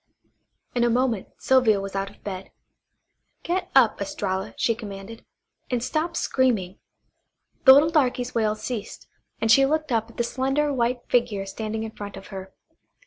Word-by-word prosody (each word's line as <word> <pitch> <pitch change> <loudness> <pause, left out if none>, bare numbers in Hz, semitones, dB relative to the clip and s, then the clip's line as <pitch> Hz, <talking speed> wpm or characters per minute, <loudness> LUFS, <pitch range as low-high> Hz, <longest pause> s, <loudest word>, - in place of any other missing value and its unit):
In 240 - +1
a 240 - +3
moment 240 -4 +1
Sylvia 250 -6 +3
was 195 0 -6
out 195 0 -2
of - - -21
bed. 190 -2 -6 0.9
"Get 365 +2 -2
up, 240 -6 +5
Estralla," 195 0 -3
she 230 - +2
commanded, 215 -1 -9 0.5
"and 245 -2 -1
stop 325 +5 -1
screaming." 215 -8 0 0.9
The 265 - +11
little 295 +4 +5
darky's 255 -5 +1
wails 215 -2 0
ceased, 230 -5 -5 0.3
and 225 - +2
she 270 +3 +7
looked 310 +1 0
up 225 -1 0
at - - -17
the 235 - +1
slender 270 +4 0
white 245 -1 0
figure 230 -5 +1
standing 220 +2 -4
in 220 - -5
front 205 -2 -8
of 195 - -11
her. 190 -1 -8
230 Hz, 160 wpm, -24 LUFS, 200-260 Hz, 0.9 s, The